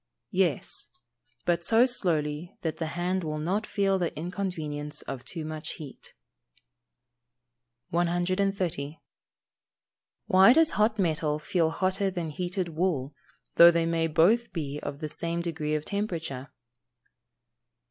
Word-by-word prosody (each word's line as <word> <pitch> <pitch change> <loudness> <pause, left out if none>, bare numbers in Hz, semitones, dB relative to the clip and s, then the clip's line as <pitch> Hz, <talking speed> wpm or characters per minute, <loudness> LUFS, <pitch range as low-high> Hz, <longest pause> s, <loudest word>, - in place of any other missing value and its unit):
_ - - -59 0.3
Yes. 180 - +1 0.6
But 170 -1 +1
so 225 +7 +5
slowly 165 - -1
that 160 -2 -2
the 160 - -2
hand 180 +1 0
will 155 -1 -3
not 185 +8 -1
feel 195 -1 +1
the 175 -2 0
inconvenience 155 -4 -3
of 130 -2 -6
too 155 +3 -4
much 155 0 -5
heat. 145 -4 -10 1.7
130. 175 -3 0 1.3
_Why 195 +4 +7
does 325 0 +5
hot 215 +1 +2
metal 155 -5 +1
feel 160 +2 +1
hotter 190 +3 0
than 175 -4 -4
heated 180 +2 -2
wool, 155 -5 -1 0.4
though 170 - +11
they 170 -1 +2
may 165 0 +1
both 185 +10 +3
be 150 -4 -4
of 140 +2 -6
the 155 - -2
same 170 +3 -3
degree 155 -3 -2
of 155 0 -3
temperature? 165 - -3
170 Hz, 125 wpm, -28 LUFS, 155-190 Hz, 1.7 s, though